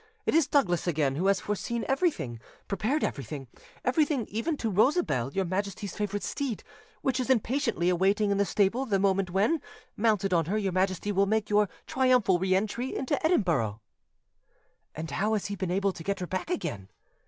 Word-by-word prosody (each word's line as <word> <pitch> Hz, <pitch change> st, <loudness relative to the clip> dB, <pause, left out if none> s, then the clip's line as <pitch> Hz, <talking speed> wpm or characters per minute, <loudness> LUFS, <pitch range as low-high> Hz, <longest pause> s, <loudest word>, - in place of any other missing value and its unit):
It -, -, +1 dB
is 320 Hz, -3 st, +4 dB
Douglas 185 Hz, -, +2 dB
again 150 Hz, -5 st, +1 dB
who 180 Hz, +6 st, 0 dB
has 195 Hz, -2 st, +3 dB
foreseen 225 Hz, +3 st, -2 dB
everything, 270 Hz, -, 0 dB, 0.3 s
prepared 220 Hz, +10 st, 0 dB
everything—everything 230 Hz, -, -2 dB
even 285 Hz, +9 st, -2 dB
to 225 Hz, -4 st, -2 dB
Rosabelle, 205 Hz, -, +2 dB
your 190 Hz, +4 st, 0 dB
Majesty's 195 Hz, +1 st, -3 dB
favourite 205 Hz, -1 st, -2 dB
steed, 270 Hz, -6 st, -3 dB, 0.4 s
which 260 Hz, -1 st, +1 dB
is 255 Hz, -, -2 dB
impatiently 235 Hz, -6 st, +1 dB
awaiting 195 Hz, +4 st, +2 dB
in 200 Hz, -, +1 dB
the 200 Hz, -, +3 dB
stable 215 Hz, +7 st, +1 dB
the 200 Hz, -4 st, +2 dB
moment 195 Hz, -1 st, +1 dB
when, 205 Hz, -, +1 dB, 0.3 s
mounted 210 Hz, -3 st, +1 dB
on 165 Hz, -2 st, +3 dB
her, 200 Hz, +7 st, -1 dB
your 200 Hz, -3 st, 0 dB
Majesty 190 Hz, +2 st, 0 dB
will 200 Hz, 0 st, +2 dB
make 215 Hz, 0 st, 0 dB
your 210 Hz, -1 st, +4 dB, 0.2 s
triumphal 250 Hz, -8 st, +3 dB
re 185 Hz, +1 st, +2 dB
entry 215 Hz, +6 st, -1 dB
into 275 Hz, +4 st, -1 dB
Edinburgh." 165 Hz, -, +1 dB, 1.2 s
"And 160 Hz, 0 st, -5 dB
how 205 Hz, +9 st, 0 dB
has 210 Hz, -, -1 dB
he 200 Hz, -, -3 dB
been 190 Hz, -2 st, -3 dB
able 195 Hz, +2 st, +1 dB
to 165 Hz, -, -9 dB
get 200 Hz, +1 st, -2 dB
her 180 Hz, -, -3 dB
back 185 Hz, -, -4 dB
again?" 100 Hz, -, -3 dB
200 Hz, 175 wpm, -28 LUFS, 185-235 Hz, 1.2 s, is